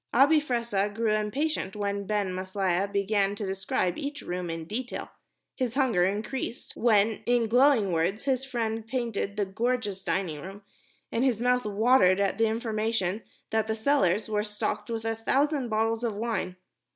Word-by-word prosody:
Abi 290 Hz, +5 st, +6 dB
Fressah 235 Hz, -7 st, 0 dB
grew 220 Hz, +1 st, 0 dB
impatient 215 Hz, 0 st, -1 dB
when 200 Hz, -1 st, -2 dB
Ben 205 Hz, -3 st, 0 dB
Maslia 185 Hz, 0 st, -1 dB
began 200 Hz, 0 st, +1 dB
to 205 Hz, -, -4 dB
describe 190 Hz, -2 st, -1 dB
each 290 Hz, +1 st, -5 dB
room 180 Hz, -1 st, -4 dB
in 165 Hz, -1 st, -4 dB
detail, 245 Hz, +8 st, -5 dB, 0.4 s
his 255 Hz, -3 st, -2 dB
hunger 240 Hz, -10 st, +3 dB
increased 220 Hz, +5 st, -3 dB
when, 220 Hz, -2 st, +3 dB
in 240 Hz, -1 st, +3 dB
glowing 245 Hz, -4 st, +4 dB
words, 170 Hz, +6 st, 0 dB
his 265 Hz, -2 st, +1 dB
friend 225 Hz, -4 st, -3 dB
painted 230 Hz, -5 st, -2 dB
the 205 Hz, -, +1 dB
gorgeous 210 Hz, -1 st, -2 dB
dining 165 Hz, -6 st, -1 dB
room, 195 Hz, +4 st, -9 dB, 0.5 s
and 230 Hz, -, 0 dB
his 250 Hz, -5 st, +2 dB
mouth 250 Hz, 0 st, +2 dB
watered 210 Hz, -2 st, +4 dB
at 200 Hz, +1 st, 0 dB
the 225 Hz, -, +4 dB
information 220 Hz, -3 st, -1 dB, 0.3 s
that 220 Hz, -1 st, +1 dB
the 220 Hz, -, 0 dB
cellars 220 Hz, -5 st, +2 dB
were 210 Hz, -1 st, 0 dB
stocked 210 Hz, +2 st, -3 dB
with 225 Hz, -1 st, -3 dB
a 225 Hz, 0 st, 0 dB
thousand 275 Hz, +3 st, +1 dB
bottles 225 Hz, +1 st, 0 dB
of 225 Hz, -3 st, -1 dB
wine. 220 Hz, -4 st, -2 dB
220 Hz, 165 wpm, -28 LUFS, 200-240 Hz, 0.5 s, Abi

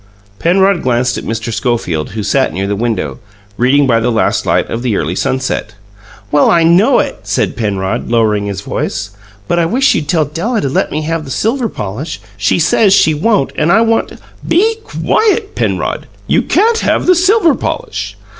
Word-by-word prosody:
Penrod 190 Hz, +1 st, +2 dB
glanced 125 Hz, 0 st, 0 dB
at -, -, -9 dB
Mr. 115 Hz, +1 st, -4 dB
Schofield, 95 Hz, -, -2 dB
who 110 Hz, -1 st, -4 dB
sat 135 Hz, +5 st, +1 dB
near 95 Hz, +1 st, -3 dB
the 100 Hz, +1 st, -1 dB
window, 115 Hz, +3 st, -2 dB, 0.4 s
reading 135 Hz, +5 st, +3 dB
by 115 Hz, -3 st, +2 dB
the 120 Hz, +2 st, 0 dB
last 115 Hz, -, 0 dB
light -, -, +1 dB
of 115 Hz, -, -4 dB
the 120 Hz, -5 st, 0 dB
early 80 Hz, +3 st, -2 dB
sunset. 130 Hz, -1 st, -2 dB, 0.6 s
"Well, 145 Hz, -, +4 dB
I 170 Hz, -1 st, +4 dB
know 185 Hz, +11 st, +4 dB
it," 285 Hz, -2 st, -1 dB
said -, -, -1 dB
Penrod, 100 Hz, -4 st, -2 dB
lowering 110 Hz, -3 st, +1 dB
his 100 Hz, -2 st, -4 dB
voice. 95 Hz, +2 st, -4 dB, 0.4 s
"But 175 Hz, -, +1 dB
I 165 Hz, -, +2 dB
wish 265 Hz, +9 st, +2 dB
you'd 150 Hz, -, -2 dB
tell 160 Hz, -4 st, +1 dB
Della 175 Hz, -, -2 dB
to 140 Hz, -, -1 dB
let -, -, 0 dB
me 155 Hz, +1 st, -2 dB
have 165 Hz, 0 st, -2 dB
the 140 Hz, -, -10 dB
silver 230 Hz, -, -1 dB
polish. 105 Hz, -, -5 dB, 0.2 s
She 105 Hz, 0 st, +1 dB
says 195 Hz, +4 st, +3 dB
she 160 Hz, -, +4 dB
won't, 185 Hz, 0 st, +1 dB
and 155 Hz, +3 st, +1 dB
I 220 Hz, -, +5 dB
want 225 Hz, 0 st, +1 dB
to -, -, -13 dB, 0.2 s
" -, -, -15 dB
"Be 440 Hz, +4 st, +2 dB
quiet, 435 Hz, -1 st, 0 dB
Penrod, -, -, -2 dB, 0.2 s
you -, -, +2 dB
can't 455 Hz, +1 st, +2 dB
have -, -, 0 dB
the 365 Hz, -, +5 dB
silver 365 Hz, -1 st, +3 dB
polish." -, -, -4 dB
150 Hz, 190 wpm, -14 LUFS, -, 0.6 s, I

